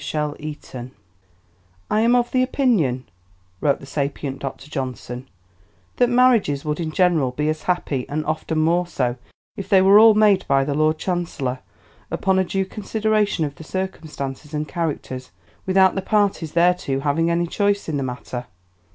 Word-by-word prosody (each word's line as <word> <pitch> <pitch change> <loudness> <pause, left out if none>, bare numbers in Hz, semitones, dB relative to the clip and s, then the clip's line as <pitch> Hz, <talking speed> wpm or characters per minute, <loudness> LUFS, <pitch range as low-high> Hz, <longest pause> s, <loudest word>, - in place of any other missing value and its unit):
CHAPTER 150 -1 -2 0.3
VI 125 -1 -7 1.0
"I 215 - +3
am 235 +2 +4
of 240 -1 +1
the 255 - +2
opinion," 215 - +1 0.6
wrote 140 +4 +1
the - - -11
sapient 140 -1 -3
Dr. 135 0 -6
Johnson, 130 -3 -5 0.7
"that 245 - +3
marriages 240 - +3
would 150 +1 -2
in 165 -2 -2
general 170 -6 +2
be 150 +4 -2
as 155 0 -2
happy, 150 -8 -2
and 155 +1 -2
often 155 +1 -2
more 170 +3 +2
so, 125 -7 -1 0.4
if 195 - -7
they 195 -3 +6
were 195 +2 +7
all 220 -1 +8
made 210 -3 +4
by 135 0 +3
the 145 - -1
Lord 155 +2 +2
Chancellor, 155 -8 -2 0.5
upon 190 -1 +1
a - - +3
due 190 +1 -1
consideration 210 -3 0
of 145 - -5
the 160 - -12
circumstances 155 -5 -5
and 150 0 -2
characters, 145 -7 -4 0.4
without 190 0 +5
the 195 - -2
parties 200 -6 0
thereto 170 -6 +2
having 155 +4 +1
any 170 0 +1
choice 200 +3 0
in 155 -3 -1
the - - -2
matter." 125 -1 -5
160 Hz, 165 wpm, -22 LUFS, 140-195 Hz, 1.0 s, all